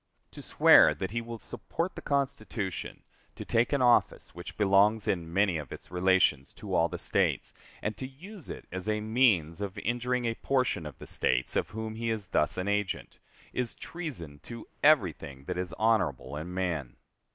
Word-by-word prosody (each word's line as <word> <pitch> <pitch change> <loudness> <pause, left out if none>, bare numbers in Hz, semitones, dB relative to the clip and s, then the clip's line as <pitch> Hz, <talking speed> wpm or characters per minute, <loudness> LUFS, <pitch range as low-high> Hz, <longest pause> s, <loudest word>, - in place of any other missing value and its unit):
To - - -9
swear - - +6
that 95 - -4
he 115 +1 -1
will 115 0 -7
support 170 - -4
the - - -8
Constitution, 125 - -3 0.3
to - - -7
take 115 +1 +2
an 140 -3 +2
office 120 -1 +3
which 85 +1 -9
belongs 105 +1 +4
in 85 -3 -1
many 95 -2 +2
of 70 -4 -9
its - - -10
relations 90 -6 +2
to - - -7
all 85 +1 +3
the - - -5
States, - - 0 0.3
and 105 - -1
to 130 - -5
use 175 +7 -12
it - - -7
as 95 +3 -4
a 105 0 +1
means 105 -7 +2
of 100 -2 -4
injuring 120 +1 -1
a 115 - +1
portion 125 - 0
of 75 - -10
the - - -10
States 60 +1 0
of - - 0
whom 110 +1 -5
he 115 +1 -3
is 105 -5 -3
thus 75 - +1
an 90 +1 -2
agent, 105 -1 -2 0.3
is 125 -2 -2
treason 115 - -7
to 115 +5 -9
everything 80 - +2
that 90 +5 -4
is 90 -1 -3
honorable 75 - +1
in 80 +4 -5
man. 85 -9 -2
105 Hz, 185 wpm, -29 LUFS, 85-120 Hz, 0.3 s, swear